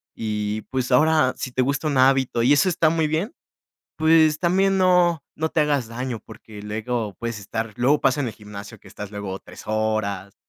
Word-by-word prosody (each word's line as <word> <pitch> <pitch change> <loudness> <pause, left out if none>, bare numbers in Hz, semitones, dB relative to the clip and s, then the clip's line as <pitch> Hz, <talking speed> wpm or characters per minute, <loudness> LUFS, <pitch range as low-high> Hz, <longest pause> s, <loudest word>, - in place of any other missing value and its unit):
Y 105 -1 -3
pues, 130 -1 -2
ahora, 155 0 +4
si 130 - -5
te 130 - 0
gusta 140 +3 -1
un 140 - 0
hábito, 130 -2 +3
y 135 - +5
eso 145 +6 +3
está 165 -2 +2
muy 160 -1 +1
bien, 165 - -2 0.6
pues, 160 -1 +4
también 190 +3 +2
no 180 -4 +3
no 160 +1 -1
te 160 - +1
hagas 145 -5 +1
daño, 120 0 -4
porque 110 -2 -12
luego 110 0 -3
puedes 115 -2 -4
estar 110 +1 -5
Luego, 135 +5 +2
pasa 130 +2 +2
en 135 - -1
el - - -7
gimnasio, 105 -1 -10
que - - -16
estás 100 0 -8
luego, 100 -2 -5
3 - - -13
horas. 110 -3 -2
130 Hz, 195 wpm, -23 LUFS, 110-155 Hz, 0.6 s, y